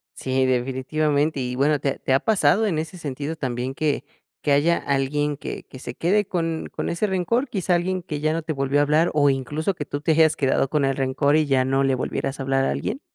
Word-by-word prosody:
Sí, 130 0 0
definitivamente. 140 +4 0
Y 125 -1 -3
bueno, 145 +2 +2
¿te 140 -1 -1
te 130 - 0
ha 135 - +4
pasado 200 +1 +3
en 170 - 0
ese 160 +3 -5
sentido 145 0 -4
también 130 -2 -3
que 145 -2 -1 0.4
que 145 - 0
haya 155 +5 +3
alguien 140 +1 -1
que - - -6
que 130 - -13
se - - -7
quede 205 +5 +2
con 165 -3 -2
con - - -2
ese 170 +5 0
rencor? 215 +8 0
¿Quizá 190 -6 0
alguien 180 +1 -1
que 150 -4 -4
ya 155 +1 +1
no 165 - -1
te 160 - -3
volvió 140 0 +1
a - - +5
hablar? 155 +4 +2
¿O 145 -2 +4
incluso 145 +7 -1
que 150 -5 -6
tú 145 - -5
te 160 - +1
hayas 160 0 +4
quedado 135 -1 +1
con 150 -3 +1
el 135 -1 0
rencor 140 +2 +1
y 155 -1 +3
ya 135 -2 +2
no 135 +1 +1
le 135 -1 +2
volvieras 135 +2 -3
a 135 - -3
hablar 135 0 +1
a - - +1
alguien? 270 - -3
145 Hz, 235 wpm, -23 LUFS, 135-165 Hz, 0.4 s, a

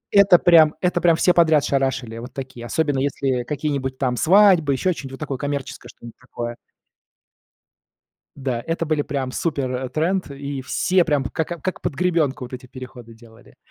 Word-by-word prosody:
Это 200 -3 +7
прям 165 -4 +5
это 180 -1 0
прям 170 -2 +4
все 180 +2 +3
подряд 160 -4 +4
шарашили, 130 -4 -1
вот 120 +3 -9
такие, 130 -3 -8
особенно 145 -3 0
если 135 -2 -1
э 120 - -9
какие-нибудь 140 -2 -3
там 125 -2 -1
свадьбы, 180 -3 +5
еще 180 +7 0
что-нибудь, 135 -4 -9
вот 135 - -9
такое 140 -4 -4
коммерческое, 140 -4 -5
что-нибудь 120 -2 -13
такое. 120 -1 -6 1.8
Да, 130 -4 -3
это 165 0 -1
были 155 -2 0
прям 135 -3 -3
супертренд, 145 +5 -2
и 140 -1 -6
все 180 +7 +1
прям 145 -5 0
как, 160 +6 -3
э, 170 - -4
как 185 - -4
под 155 - -2
гребенку 155 -6 0
вот 125 - -13
эти 125 0 -8
переходы 125 -2 -11
делали. 115 +1 -19
140 Hz, 170 wpm, -21 LUFS, 130-165 Hz, 1.8 s, Это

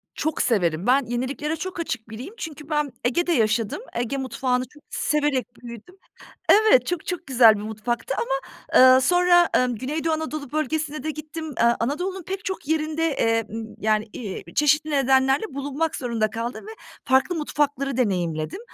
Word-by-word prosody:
Çok 310 +1 -1
severim. 180 -5 +1
Ben 265 +1 +4
yeniliklere 275 +6 -2
çok 370 +2 -6
açık 225 -9 -4
biriyim 250 - -8
çünkü 305 -5 -8
ben 300 -2 0
Ege'de 345 +9 +1
yaşadım. 225 - +1
Ege 240 +3 -2
mutfağını 255 -1 -1
çok 295 +3 -20
severek 295 -4 0
büyüdüm. 235 - -11 0.5
Evet, 415 - +6
çok 355 -2 -3
çok 355 -1 -4
güzel 235 -4 +6
bir 205 - -6
mutfaktı 220 +2 -3
ama, 265 +3 0 0.6
eee, 260 - +5
sonra, 355 +3 +4
emm, 250 -1 +2
Güneydoğu 305 +7 -2
Anadolu 310 -3 -4
Bölgesi'ne 305 0 -2
de 310 - -2
gittim. 310 +1 -7
Eee, - - +3 0.2
Anadolu'nun 360 +10 -2
pek 380 +3 -6
çok 380 -6 -5
yerinde, 315 0 0
eee, 225 0 +2
ımm, 225 0 -5
yani, 215 0 +1
iii, 205 -6 -6
çeşitli 300 +1 +3
nedenlerle 270 - +3
bulunmak 285 +3 -2
zorunda 230 -4 -1
kaldım 235 - -5
ve 440 - -8 0.3
farklı 270 +7 +2
mutfakları 285 -3 -1
deneyimledim. 175 - -1
275 Hz, 155 wpm, -24 LUFS, 235-315 Hz, 0.6 s, Evet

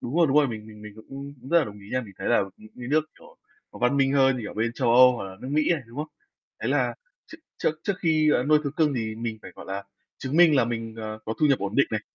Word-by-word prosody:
Đúng 125 +7 -4
rồi, 170 - +5
đúng 140 0 +1
rồi. 145 -3 +5
Mình 110 -2 -7
mình 105 -1 -13
mình 105 -1 -10
cũng 140 +5 -9 0.2
rất 170 - +6
là 165 - +2
đồng 105 -1 -9
ý 100 - -14
nha. 130 - +1
Mình 105 -6 -11
thấy - - -3
là - - +4
những 110 0 -16
cái 125 0 -6
nước, 155 +2 +3 0.2
kiểu, - - -17 0.4
văn 125 +3 +1
minh 135 -1 +3
hơn, 135 -1 +4
kiểu, 105 - -7
bên 115 +2 -1
Châu 125 -1 0
Âu 125 +1 +8
hoặc 100 - -5
là 95 -1 -9
nước 130 - -7
Mỹ 150 +2 +2
này, 160 -5 -2
đúng 115 +2 -15
không? 155 +1 -3 0.5
Thế - - -1
là - - +1 0.3
trước 325 - -12 0.2
trước - - +2
trước 200 - +1
khi, 155 -2 +3
ờ, 125 - +2
nuôi 150 +2 +5
thú 140 - -1
cưng 150 -3 +2
thì 110 -3 -2
mình 115 -1 -5
phải, - - -10
gọi - - -11
là, 100 +1 -4 0.4
chứng 135 +3 -3
minh 165 -4 +6
là 130 - +4
mình, 115 -1 -4
ờ, 110 -1 -6
có 110 - -3
thu 155 - +5
nhập 140 -3 +3
ổn 100 0 -4
định - - +5
này, - - -1
125 Hz, 295 wpm, -25 LUFS, 110-145 Hz, 0.5 s, Âu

